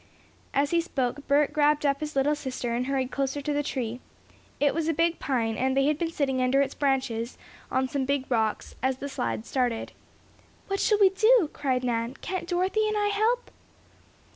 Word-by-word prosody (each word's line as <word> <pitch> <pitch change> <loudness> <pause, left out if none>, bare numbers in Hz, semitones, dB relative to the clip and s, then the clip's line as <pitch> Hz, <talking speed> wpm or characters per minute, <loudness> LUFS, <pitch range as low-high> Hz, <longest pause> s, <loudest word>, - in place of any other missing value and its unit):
As 280 +1 +1
he 340 0 +3
spoke 280 -4 -3
Bert 285 +1 +3
grabbed 300 0 +3
up 280 -1 +2
his 305 -1 -5
little 275 +2 +3
sister 255 -4 -3
and 245 +2 -1
hurried 265 -2 -1
closer 275 +1 -1
to 290 +1 -2
the 290 - +1
tree. 245 -4 -3 0.6
It 285 0 +3
was 325 0 -1
a 325 - +1
big 335 +1 +1
pine, 230 -5 0
and 260 +3 0
they 275 - +4
had 300 +1 +1
been 335 - 0
sitting 270 -5 0
under 255 +2 +3
its 275 0 +1
branches, 255 -4 -1 0.3
on 260 0 +1
some 270 0 -2
big 280 0 0
rocks, 220 -3 -1
as 260 0 0
the 280 - -5
slide 115 - -3
started. 245 -4 -1 0.7
"What 390 0 -2
shall 425 - +3
we 395 -2 +7
do?" 435 -3 +4
cried 255 -3 -1
Nan. 235 +1 -1
"Can't 370 -1 -4
Dorothy 375 +5 +1
and 425 0 0
I 415 0 +2
help?" 445 +4 0
280 Hz, 195 wpm, -27 LUFS, 255-325 Hz, 0.7 s, we